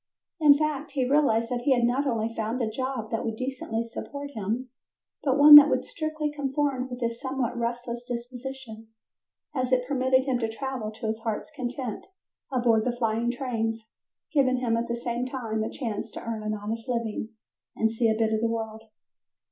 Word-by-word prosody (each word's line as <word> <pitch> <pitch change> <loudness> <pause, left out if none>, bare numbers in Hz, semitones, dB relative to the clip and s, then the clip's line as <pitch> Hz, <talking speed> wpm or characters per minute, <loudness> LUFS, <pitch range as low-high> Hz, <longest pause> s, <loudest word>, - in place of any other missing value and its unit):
In 290 -2 +7
fact 300 -1 -2
he 260 -3 +1
realized 250 -5 +2
that 245 -1 -1
he 265 +1 +3
had 240 - +1
not 255 +4 +2
only 230 -2 -1
found 225 +3 -2
a 235 - 0
job 245 -1 -3
that 225 - -1
would 225 -1 -2
decently 255 -2 -3
support 280 +5 -7
him, 230 +3 -3 0.5
but 270 -1 +1
one 295 +1 +9
that 295 0 +6
strictly 310 -1 -3
conformed 275 -2 -1
with 250 0 -7
his 230 0 -2
somewhat 260 -3 -2
restless 240 0 -3
disposition, 245 -1 -7 0.7
as 255 -2 -1
it 250 -1 +2
permitted 260 -1 +2
him 260 -3 0
to 225 -2 -1
travel 250 -1 -4
to 220 +1 -8
his 220 0 -1
heart's 225 -1 -4
content 250 -2 -5 0.4
aboard 235 -4 +3
the 250 - +1
flying 230 0 0
trains, 230 -3 -2 0.5
giving 260 -3 +3
him 240 -2 +1
at 230 +1 -1
the 235 - -1
same 240 +1 -3
time 225 -4 -3
a - - -2
chance 225 -6 -4
to - - -8
earn 225 -1 -4
an 215 0 -2
honest 225 +4 -5
living 230 -2 -2 0.5
and 220 0 +1
see 230 0 +2
a 220 - +1
bit 220 -1 +1
of 220 - 0
the 230 - +2
world. 220 -1 -4
240 Hz, 190 wpm, -27 LUFS, 225-265 Hz, 0.7 s, one